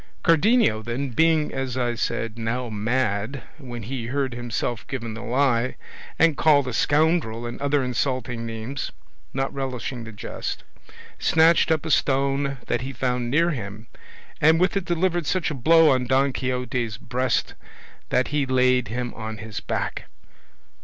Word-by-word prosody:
Cardenio, 165 Hz, -, +4 dB
then, 120 Hz, +5 st, -3 dB
being, 160 Hz, +3 st, +2 dB
as 130 Hz, -2 st, -3 dB
I 120 Hz, -1 st, 0 dB
said, 115 Hz, -1 st, -2 dB
now 115 Hz, +2 st, -2 dB
mad, 110 Hz, +2 st, -1 dB, 0.2 s
when 120 Hz, -5 st, -7 dB
he 120 Hz, +1 st, -4 dB
heard 135 Hz, 0 st, -1 dB
himself 120 Hz, -1 st, -3 dB
given 115 Hz, -4 st, -4 dB
the 115 Hz, -, -7 dB
lie, 125 Hz, 0 st, +1 dB, 0.4 s
and 165 Hz, -2 st, +4 dB
called 145 Hz, -3 st, +4 dB
a 125 Hz, -, -3 dB
scoundrel 145 Hz, -4 st, +2 dB
and 120 Hz, +2 st, -6 dB
other 140 Hz, -1 st, +2 dB
insulting 125 Hz, -1 st, -2 dB
names, 115 Hz, +4 st, -5 dB, 0.4 s
not 135 Hz, 0 st, -2 dB
relishing 130 Hz, -2 st, -4 dB
the 110 Hz, -, -8 dB
jest, 105 Hz, -, -5 dB, 0.6 s
snatched 160 Hz, +2 st, +4 dB
up 160 Hz, -1 st, +1 dB
a 160 Hz, -, -2 dB
stone 140 Hz, 0 st, +1 dB
that 120 Hz, -, -1 dB
he 130 Hz, +2 st, -4 dB
found 125 Hz, -1 st, -1 dB
near 165 Hz, +6 st, +3 dB
him, 110 Hz, -5 st, -6 dB, 0.6 s
and 160 Hz, +2 st, +5 dB
with 185 Hz, +3 st, +2 dB
it 195 Hz, -3 st, -1 dB
delivered 175 Hz, -2 st, 0 dB
such 185 Hz, -4 st, 0 dB
a -, -, -2 dB
blow 160 Hz, +4 st, +5 dB
on 130 Hz, -1 st, +1 dB
Don 135 Hz, +2 st, +3 dB
Quixote's 125 Hz, -3 st, -2 dB
breast 125 Hz, 0 st, -1 dB, 0.6 s
that 130 Hz, -, +1 dB
he 145 Hz, -2 st, 0 dB
laid 125 Hz, -1 st, +3 dB
him 120 Hz, +3 st, -3 dB
on 110 Hz, -1 st, -6 dB
his 110 Hz, -1 st, -6 dB
back. -, -, -3 dB
130 Hz, 155 wpm, -24 LUFS, 115-145 Hz, 0.6 s, and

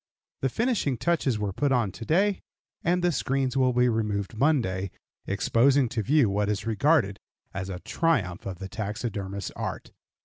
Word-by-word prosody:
The 135 Hz, -, +1 dB
finishing 220 Hz, -, 0 dB
touches 140 Hz, -4 st, +1 dB
were 105 Hz, -2 st, -2 dB
put 145 Hz, +6 st, 0 dB
on 120 Hz, -6 st, +2 dB
to 115 Hz, -, -9 dB
day, 195 Hz, -, +2 dB, 0.4 s
and 175 Hz, +1 st, +1 dB
the 175 Hz, -, +3 dB
screens 135 Hz, -2 st, 0 dB
will 130 Hz, -1 st, +3 dB
be 125 Hz, 0 st, +3 dB
removed 105 Hz, -3 st, -1 dB
Monday, 110 Hz, -9 st, +1 dB, 0.4 s
exposing 125 Hz, +7 st, +3 dB
to 110 Hz, -, -1 dB
view 140 Hz, +2 st, +3 dB
what 100 Hz, +1 st, 0 dB
is 105 Hz, +1 st, -2 dB
regarded 115 Hz, -2 st, +2 dB, 0.3 s
as 100 Hz, 0 st, -4 dB
a 90 Hz, -2 st, -5 dB
triumph 110 Hz, -, 0 dB
of 95 Hz, -2 st, -5 dB
the 95 Hz, -, -6 dB
taxidermist's 100 Hz, -1 st, -4 dB
art. -, -, -5 dB
115 Hz, 165 wpm, -27 LUFS, 100-140 Hz, 0.4 s, the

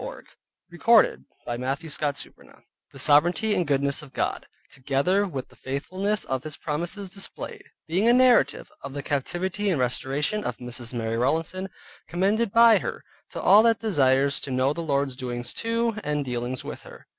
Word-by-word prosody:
MARY -, -, -8 dB, 0.5 s
ROWLANDSON 225 Hz, +6 st, +4 dB, 0.2 s
By 120 Hz, -, -3 dB
Mrs. 135 Hz, +5 st, -3 dB
Mary 145 Hz, -2 st, -2 dB
Rowlandson -, -, -20 dB, 0.3 s
The -, -, -13 dB
sovereignty 175 Hz, +8 st, +4 dB
and 180 Hz, -5 st, 0 dB
goodness 140 Hz, +1 st, +1 dB
of 150 Hz, -3 st, -14 dB
GOD, -, -, -2 dB, 0.2 s
together 140 Hz, +10 st, +1 dB
with 135 Hz, -7 st, -6 dB
the -, -, -20 dB
faithfulness 185 Hz, +10 st, -2 dB
of 130 Hz, 0 st, -3 dB
his 155 Hz, -2 st, -6 dB
promises 175 Hz, +6 st, -3 dB
displayed, 390 Hz, -, -6 dB, 0.2 s
being 185 Hz, +7 st, +1 dB
a -, -, +6 dB
narrative 245 Hz, -, +3 dB
of 140 Hz, 0 st, -7 dB
the 145 Hz, -1 st, -5 dB
captivity 185 Hz, +9 st, -2 dB
and 170 Hz, -7 st, +1 dB
restoration 135 Hz, -, -1 dB
of 125 Hz, -, -3 dB
Mrs. 125 Hz, -1 st, -7 dB
Mary 115 Hz, -1 st, -2 dB
Rowlandson, 165 Hz, +9 st, -1 dB, 0.4 s
commended 200 Hz, +5 st, +1 dB
by 230 Hz, 0 st, +7 dB
her, -, -, -5 dB, 0.3 s
to -, -, -7 dB
all 205 Hz, +3 st, +7 dB
that 230 Hz, -1 st, +4 dB
desires 140 Hz, -, +2 dB
to 140 Hz, -, -5 dB
know 130 Hz, +2 st, +1 dB
the 170 Hz, -, -5 dB
Lord's 140 Hz, -4 st, -1 dB
doings 120 Hz, -1 st, -5 dB
to, 230 Hz, 0 st, 0 dB
and 150 Hz, -1 st, -1 dB
dealings 125 Hz, 0 st, -3 dB
with -, -, -7 dB
her. -, -, -14 dB
150 Hz, 170 wpm, -25 LUFS, 135-200 Hz, 0.5 s, by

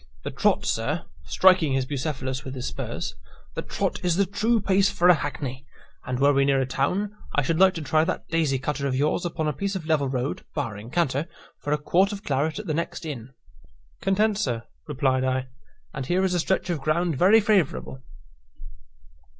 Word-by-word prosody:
The -, -, -4 dB
trot, -, -, +1 dB
sir" -, -, -1 dB, 0.2 s
(striking 185 Hz, -6 st, +4 dB
his 135 Hz, -1 st, +1 dB
Bucephalus 130 Hz, -1 st, -3 dB
with 130 Hz, 0 st, -6 dB
his 125 Hz, -, -5 dB
spurs), -, -, -4 dB, 0.4 s
"the -, -, -3 dB
trot -, -, -3 dB
is 175 Hz, -2 st, +2 dB
the 200 Hz, +2 st, +3 dB
true 215 Hz, +5 st, +1 dB
pace 195 Hz, 0 st, +3 dB
for 195 Hz, -3 st, +3 dB
a -, -, +10 dB
hackney; 140 Hz, -4 st, -4 dB, 0.4 s
and, 125 Hz, 0 st, -2 dB
were 140 Hz, +1 st, +5 dB
we 140 Hz, 0 st, +3 dB
near 135 Hz, -1 st, +3 dB
a 130 Hz, -, +1 dB
town, 185 Hz, +11 st, -1 dB, 0.2 s
I 145 Hz, -, +3 dB
should 165 Hz, +4 st, 0 dB
like 190 Hz, 0 st, +6 dB
to 165 Hz, -, -4 dB
try 155 Hz, +2 st, +3 dB
that 185 Hz, -, -3 dB
daisy 160 Hz, -5 st, +1 dB
cutter 140 Hz, +1 st, -2 dB
of 130 Hz, -, -1 dB
yours 150 Hz, +6 st, +1 dB
upon 160 Hz, -2 st, -2 dB
a 150 Hz, -, 0 dB
piece 200 Hz, +7 st, -3 dB
of 175 Hz, -4 st, -4 dB
level 150 Hz, -4 st, +1 dB
road 130 Hz, +1 st, -2 dB
(barring 115 Hz, -6 st, -4 dB
canter) 145 Hz, -1 st, 0 dB, 0.3 s
for 145 Hz, -, -4 dB
a 150 Hz, -, +3 dB
quart 180 Hz, +7 st, +2 dB
of 205 Hz, 0 st, -6 dB
claret 145 Hz, +3 st, 0 dB
at -, -, -5 dB
the 155 Hz, -, -1 dB
next 165 Hz, +1 st, -3 dB
inn." 135 Hz, -4 st, -6 dB, 0.7 s
"Content, 205 Hz, +2 st, +2 dB
sir," 120 Hz, -, -1 dB, 0.2 s
replied 135 Hz, -3 st, +1 dB
I; 130 Hz, 0 st, -1 dB, 0.4 s
"and 135 Hz, -, -4 dB
here 185 Hz, +2 st, +2 dB
is 185 Hz, -, 0 dB
a 175 Hz, -, +1 dB
stretch 185 Hz, +1 st, 0 dB
of 160 Hz, -5 st, -2 dB
ground 160 Hz, +3 st, +1 dB
very 195 Hz, +10 st, +6 dB
favourable." 195 Hz, -10 st, 0 dB
155 Hz, 200 wpm, -25 LUFS, 135-185 Hz, 0.7 s, a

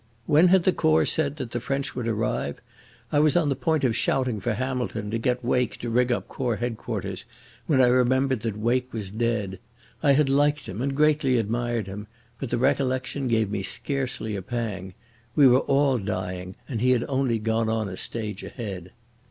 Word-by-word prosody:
When 155 Hz, +5 st, +5 dB
had 185 Hz, 0 st, +5 dB
the 185 Hz, -, +3 dB
Corps 80 Hz, 0 st, +3 dB
said 145 Hz, -3 st, 0 dB
that 130 Hz, -6 st, -6 dB
the 120 Hz, -, -2 dB
French 135 Hz, +3 st, -2 dB
would 120 Hz, -2 st, -3 dB
arrive?... 110 Hz, -10 st, -1 dB, 0.5 s
I 145 Hz, -, +3 dB
was 155 Hz, +2 st, +4 dB
on 160 Hz, -4 st, +2 dB
the 140 Hz, -, +1 dB
point 160 Hz, 0 st, 0 dB
of 120 Hz, -4 st, +2 dB
shouting 125 Hz, -2 st, 0 dB
for 115 Hz, +1 st, -1 dB
Hamilton 120 Hz, -4 st, -3 dB
to 115 Hz, -, -1 dB
get 125 Hz, +1 st, -1 dB
Wake 125 Hz, 0 st, +1 dB
to 120 Hz, -, -4 dB
ring 125 Hz, +1 st, +2 dB
up 120 Hz, -, -1 dB
Corps 125 Hz, -4 st, -2 dB
Headquarters, 120 Hz, 0 st, -4 dB, 0.4 s
when 140 Hz, -4 st, +3 dB
I 130 Hz, -, +7 dB
remembered 130 Hz, +1 st, +3 dB
that 110 Hz, -1 st, -3 dB
Wake 125 Hz, +3 st, 0 dB
was 105 Hz, -4 st, -5 dB
dead. 105 Hz, -4 st, -1 dB, 0.4 s
I 145 Hz, -2 st, +5 dB
had 145 Hz, +1 st, +3 dB
liked 145 Hz, +1 st, +2 dB
him 95 Hz, +5 st, -5 dB
and 135 Hz, +1 st, -1 dB
greatly 150 Hz, -4 st, +3 dB
admired 115 Hz, 0 st, -1 dB
him, 100 Hz, +2 st, -7 dB, 0.3 s
but 135 Hz, -, -4 dB
the 120 Hz, -, 0 dB
recollection 130 Hz, 0 st, 0 dB
gave 110 Hz, -3 st, +1 dB
me 105 Hz, -, -1 dB
scarcely 130 Hz, -1 st, -3 dB
a 100 Hz, -, -3 dB
pang. 95 Hz, -4 st, -4 dB, 0.4 s
We 145 Hz, -3 st, +7 dB
were 125 Hz, 0 st, +6 dB
all 135 Hz, -2 st, +2 dB
dying, 95 Hz, -2 st, -4 dB
and 115 Hz, -5 st, -3 dB
he 125 Hz, -, +3 dB
had 125 Hz, -2 st, +3 dB
only 130 Hz, -4 st, +1 dB
gone 110 Hz, +1 st, 0 dB
on 110 Hz, -1 st, 0 dB
a 95 Hz, -, -6 dB
stage 105 Hz, -1 st, -4 dB
ahead. 95 Hz, -7 st, -7 dB
120 Hz, 195 wpm, -25 LUFS, 110-135 Hz, 0.5 s, I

